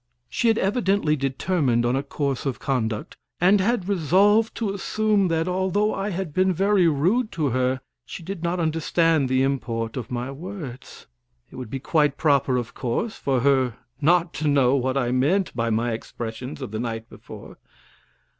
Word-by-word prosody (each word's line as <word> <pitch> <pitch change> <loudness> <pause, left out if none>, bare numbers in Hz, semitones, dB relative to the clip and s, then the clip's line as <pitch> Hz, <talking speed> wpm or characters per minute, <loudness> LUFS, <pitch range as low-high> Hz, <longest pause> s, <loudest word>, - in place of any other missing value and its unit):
She 235 - 0
had 225 -1 +4
evidently 195 -6 +1
determined 135 -2 0
on 120 +2 +1
a 135 - +1
course 140 0 -3
of 135 - -2
conduct 115 -6 -2 0.2
and 190 +3 +4
had 200 -2 0
resolved 200 +5 +3
to 210 -4 -2
assume 210 0 +1
that, 165 0 0
although 190 +3 +1
I 195 +1 -2
had 185 -5 -4
been 185 +2 +3
very 195 0 +3
rude 185 - +1
to 155 -4 0
her, 130 +1 0 0.2
she 170 - -9
did 190 0 -6
not 175 +1 -1
understand 165 -2 +1
the 130 0 +2
import 115 -4 -2
of 120 - -5
my 125 +2 -3
words. 150 -4 -9 0.5
It - - -13
would 125 -4 -7
be 135 - -4
quite 150 0 +1
proper, 140 -4 +2
of 120 -3 -4
course, 135 - -2
for 130 -3 0
her 130 -3 +2 0.2
not 170 +2 +3
to 155 - -2
know 140 -2 +4
what 130 0 0
I 125 -2 0
meant 160 +10 +1
by 115 -1 0
my 115 +2 0
expressions 120 +4 -6
of 125 - -6
the 110 - -4
night 115 -1 -4
before. - - -12
145 Hz, 175 wpm, -24 LUFS, 130-185 Hz, 0.5 s, had